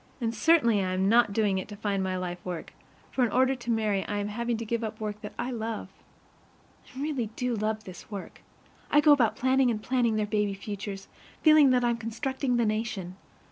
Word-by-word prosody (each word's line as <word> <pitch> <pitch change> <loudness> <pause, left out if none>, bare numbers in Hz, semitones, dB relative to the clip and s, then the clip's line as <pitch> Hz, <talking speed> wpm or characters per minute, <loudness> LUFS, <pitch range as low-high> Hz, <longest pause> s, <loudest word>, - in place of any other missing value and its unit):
And 230 -2 -1
certainly 235 -5 +4
I 185 0 -1
am 190 +1 +1
not 235 -1 +5
doing 200 -2 +1
it - - -6
to 210 - -8
find 200 -1 -1
my 185 0 -1
life 180 -1 -5
work, 175 -3 -6 0.4
for 260 - +1
in 235 - +1
order 260 +3 +3
to 240 -2 -8
marry 215 -4 +1
I 205 - -2
am 205 0 -2
having 235 +2 -2
to 230 - -5
give 230 +1 -2
up 220 0 -4
the 220 - -7
work 210 0 -4
that 210 - -8
I 255 - -2
love. 225 -2 -4 1.0
I 255 - -11
really 280 -5 -1
do 250 -1 -1
love 215 0 -2
this 185 -1 -11
work. 200 -3 -8 0.5
I 295 - +5
go 295 0 +6
about 235 -7 +4
planning 260 +1 +3
and 225 -3 -1
planning 235 -1 +1
their 215 -1 +1
baby 210 -1 0
futures, 195 -1 -6 0.4
feeling 310 -3 +7
that 250 -1 +3
I'm 240 -1 +1
constructing 245 +3 -2
the 235 - +2
nation. 215 -4 -2
220 Hz, 215 wpm, -28 LUFS, 205-245 Hz, 1.0 s, feeling